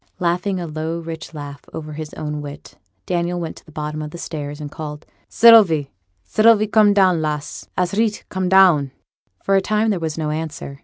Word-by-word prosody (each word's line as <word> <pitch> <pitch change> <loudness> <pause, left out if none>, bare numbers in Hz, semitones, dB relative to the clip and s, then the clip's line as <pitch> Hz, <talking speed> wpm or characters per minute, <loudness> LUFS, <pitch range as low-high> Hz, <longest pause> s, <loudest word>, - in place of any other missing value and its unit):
Laughing 180 +2 -1
a 175 - -4
low 160 +1 -4
rich 165 -1 -7
laugh 145 -2 -8
over 155 -1 -6
his 155 0 -7
own 150 -1 -4
wit, 145 0 -10 0.3
Daniel 175 0 -1
went 165 -2 -5
to - - -15
the 160 - -17
bottom 150 0 -4
of 150 - -5
the 170 - -9
stairs, 145 -3 -6
and 145 -1 -7
called, 150 -1 -7 0.2
'Sylvie, 200 -11 +6 0.3
Sylvie! 215 - +4
come 215 -1 +4
down, 185 -4 +3
lass! 150 -2 -4
a's 180 0 0
reet; 215 0 0
come 185 -1 -2
down!' 180 -7 +5 0.5
For 195 - +2
a 195 - +4
time 215 +2 +1
there 190 - -1
was 160 -2 -3
no 155 -1 -2
answer. 155 -3 -5
165 Hz, 195 wpm, -20 LUFS, 150-190 Hz, 0.5 s, Sylvie